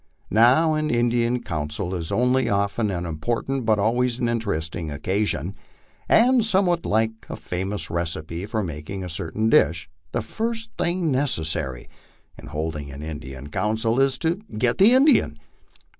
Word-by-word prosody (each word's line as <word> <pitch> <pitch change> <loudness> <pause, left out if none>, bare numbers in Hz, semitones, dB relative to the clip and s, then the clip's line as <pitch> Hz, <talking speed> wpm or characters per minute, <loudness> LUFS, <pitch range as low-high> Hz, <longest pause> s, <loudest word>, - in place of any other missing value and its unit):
Now 130 +9 +5
an 155 0 0
Indian 120 0 +1
council 75 +4 -3
is 85 -3 -4
not - - -1
only 125 +1 +2
often 100 +2 0
an 90 -2 -3
important 115 - -2
but 110 -1 +4
always 120 +4 +1
an 120 - 0
interesting 85 -8 -2
occasion. 90 +2 -1 0.6
And, 245 +1 +5
somewhat 185 -5 +1
like 110 +1 +2 0.2
a - - -4
famous 95 +3 -3
recipe 85 +1 -3
for 110 0 -1
mak 75 -3 -7
ing 95 -1 -4
a 90 - -5
certain 90 +6 -2
dish, 80 -5 +2 0.2
the 120 - -2
first 225 - -3
thing 175 -2 0
necessary 80 - -1 0.5
in - - -12
holding 75 -1 -4
an 70 +1 -8
Indian 75 -3 -7
council 110 - 0
is 135 -1 +3
to 165 +5 0 0.2
get 120 +1 +1
the 200 +5 +7
Indian. 260 - +4
105 Hz, 155 wpm, -23 LUFS, 80-125 Hz, 0.6 s, the